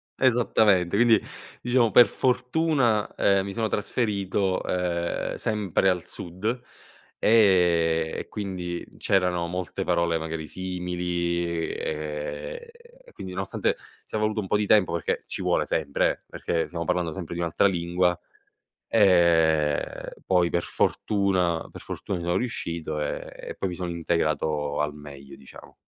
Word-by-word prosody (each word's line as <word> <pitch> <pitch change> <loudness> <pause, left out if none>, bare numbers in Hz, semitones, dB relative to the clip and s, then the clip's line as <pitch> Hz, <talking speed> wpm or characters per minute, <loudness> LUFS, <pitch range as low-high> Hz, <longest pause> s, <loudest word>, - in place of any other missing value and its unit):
esattamente, 110 -7 +3
quindi, 115 -1 +5 0.4
diciamo 120 -2 +2
per 120 - +8
fortuna, 125 -3 +1
ehm, 100 -1 +3
mi 100 0 -5
sono 110 -1 0
trasferito, 100 -3 -1
ehm, 85 -1 -1
sempre 100 -3 +1
al 90 -2 -1
sud, 90 +4 -9 0.7
ehm, 85 -7 +3
e - - -7
quindi 90 -4 -4
c'erano 90 -3 +1
molte 90 +2 -4
parole 85 -2 +1
magari 80 -1 -4
simili 90 0 -2 0.3
e, 75 - -5 0.4
ehm, - - -15
quindi 95 -1 -7
nonostante, 95 +1 -1 0.3
sia 110 - -3
voluto 110 0 0
un 100 - -2
po' 105 - +1
di 105 -1 -1
tempo 100 -5 +4
perché, 85 - -1
ci - - -5
vuole - - +1
sempre 70 -3 +1
eh, - - -9
perché 85 -1 -2
stiamo 85 -1 -4
parlando 90 -1 0
sempre 85 -1 -6
di 85 - -5
un'altra 85 +3 +1
lingua, 90 0 +1 0.7
ehm, 85 -7 +3 0.2
poi 90 -2 +3
per 85 - 0
fortuna 95 -5 0
per - - -10
fortuna 95 - -4
ci 85 - -6
sono 85 +1 +1
riuscito, 85 -10 -3
ehm, - - -3 0.2
e - - -6
poi 95 - -2
mi 90 - -5
son 90 0 -4
integrato 75 -3 0
al 75 0 -2
meglio 70 -2 -11
diciamo. 65 - -14
90 Hz, 140 wpm, -26 LUFS, 85-100 Hz, 0.7 s, per